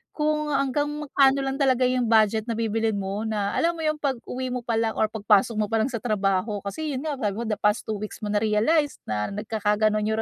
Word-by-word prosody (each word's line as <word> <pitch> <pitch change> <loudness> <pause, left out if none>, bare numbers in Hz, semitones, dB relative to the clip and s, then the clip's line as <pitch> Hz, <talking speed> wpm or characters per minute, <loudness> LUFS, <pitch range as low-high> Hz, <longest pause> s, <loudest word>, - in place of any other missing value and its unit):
kung 300 0 0
hanggang 275 +1 +1
magkano 280 -2 +2
lang 270 0 -2
talaga 260 -3 +2
yung 250 -1 +1
budget 220 -1 +3
na - - +1
bibilhin 225 0 0
mo 200 +2 -3
na, 210 -2 -1
alam 335 +1 +2
mo - - -5
yung 305 0 +1
pag-uwi 260 -1 -3
mo 250 - -3
palang 225 -1 0
or 215 - +2
pag-pasok 215 0 +2
mo 215 - +2
palang 225 +2 +1
sa 245 - -3
trabaho, 205 -2 0
kasi 290 +10 -4
yun 260 - -3
nga 295 -3 -2
sabi 210 -6 -1
mo 235 - -3
the 210 - -1
past 210 +2 +1
2 215 -1 -2
weeks 215 +2 -7
mo 210 - -3
na-realize 220 +9 +2
na 105 - -2
nagkaka-ganon 210 0 0
yung 220 +1 0
225 Hz, 215 wpm, -25 LUFS, 210-270 Hz, -, budget